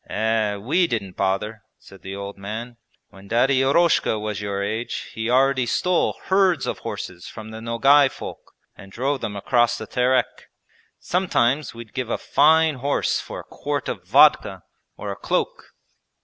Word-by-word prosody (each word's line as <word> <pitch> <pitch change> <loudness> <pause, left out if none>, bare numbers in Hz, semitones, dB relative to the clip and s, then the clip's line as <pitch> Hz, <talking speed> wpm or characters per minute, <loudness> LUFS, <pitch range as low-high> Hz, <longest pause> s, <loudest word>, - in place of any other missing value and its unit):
'Eh, 110 -1 0
we 145 - +1
didn't 100 - -4
bother,' 100 +3 -1 0.2
said 95 -1 -16
the 95 0 -7
old 100 0 -6
man; 110 +5 -6 0.4
'when 95 +1 -15
Daddy 130 +5 +3
Eroshka 140 -3 +3
was 105 -1 -4
your 100 -1 -2
age 110 +4 -4
he 110 0 -3
already 130 0 +3
stole 180 +8 +1
herds 190 -6 +2
of - - -3
horses 90 -1 -7
from 110 -1 -9
the 110 0 -8
Nogay 135 +5 +4
folk - - -10 0.2
and 95 - -14
drove 135 +5 -2
them 105 - -4
across 120 +4 +2
the 110 - -6
Terek. 125 +3 0 0.5
Sometimes 150 -8 0
we'd 115 -2 -11
give 130 -3 -3
a - - 0
fine 160 0 +3
horse 140 +3 0
for - - -7
a - - -16
quart - - -4
of - - -4
vodka - - +4 0.3
or - - -5
a - - -5
cloak.' - - -3
115 Hz, 165 wpm, -23 LUFS, 105-135 Hz, 0.5 s, Nogay